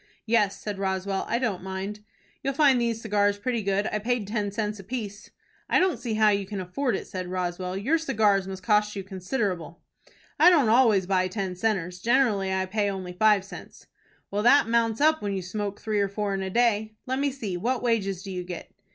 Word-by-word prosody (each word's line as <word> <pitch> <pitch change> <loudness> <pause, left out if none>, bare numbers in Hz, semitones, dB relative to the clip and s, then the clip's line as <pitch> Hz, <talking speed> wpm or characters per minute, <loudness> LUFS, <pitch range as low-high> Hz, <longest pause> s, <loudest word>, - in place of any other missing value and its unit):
"Yes," 215 -3 +2
said 205 -2 -5
Roswell, 190 0 -1
"I 235 - +1
don't 230 -7 -1
mind." 190 +2 -5 0.4
"You'll 275 0 -2
find 275 -4 +4
these 230 -1 0
cigars 205 -2 +2
pretty 235 +2 -1
good. 200 +1 0
I 215 - -1
paid 235 0 -1
ten 205 -1 -2
cents 210 0 -3
apiece." 210 0 -6 0.4
"I - - +4
don't 375 -1 +1
see 230 -3 -3
how 215 0 +5
you 200 -2 0
can 200 -1 -5
afford 195 +7 -1
it," - - -4
said 185 -1 -5
Roswell. 180 0 -3
"Your 280 +12 +1
cigars 210 -10 +2
must 190 -1 -7
cost 210 +1 +2
you 195 - -4
considerable." 185 - -3 0.6
"I 330 +4 +8
don't 295 -10 +4
always 220 -5 +4
buy 185 -1 +1
ten 190 -1 -4
centers. 180 -3 -1
Generally 225 -4 +2
I 190 0 0
pay 205 +2 0
only 185 -2 -5
five 205 0 +3
cents." - - -11 0.5
"Well, 205 +1 0
that 245 +2 +5
mounts 230 +1 +1
up 315 +1 +4
when 200 -1 -2
you 190 - -3
smoke 200 +2 -4
three 215 -2 -1
or 200 -1 +1
four 200 0 -2
in 195 - -2
a 190 - -3
day. 220 0 +1
Let 260 +1 -2
me 285 0 +1
see, 225 -9 -5
what 240 +8 -1
wages 195 -6 0
do 195 - -7
you 180 -1 -4
get?" 175 -1 -8
205 Hz, 210 wpm, -26 LUFS, 190-230 Hz, 0.6 s, I